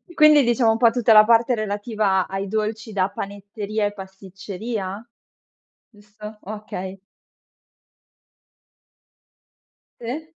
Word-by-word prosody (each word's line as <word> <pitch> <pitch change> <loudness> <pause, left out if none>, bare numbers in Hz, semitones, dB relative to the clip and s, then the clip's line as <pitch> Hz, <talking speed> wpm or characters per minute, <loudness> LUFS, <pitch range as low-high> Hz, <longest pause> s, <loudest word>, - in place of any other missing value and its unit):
Quindi 305 -2 +6
diciamo 240 -1 +3
un 225 - 0
po' 230 0 +5
tutta 230 -1 +3
la 215 0 +9
parte 235 +2 +3
relativa 205 -2 -1
ai 195 +1 -4
dolci 215 +2 -3
da 190 -1 +1
panetteria 205 +2 -4
e 205 - -2
pasticceria? 195 +2 -7 0.8
Giusto, 210 0 -12
okay. 195 -2 -7 3.0
Sì. 255 +7 -5
210 Hz, 100 wpm, -22 LUFS, 200-230 Hz, 3.0 s, la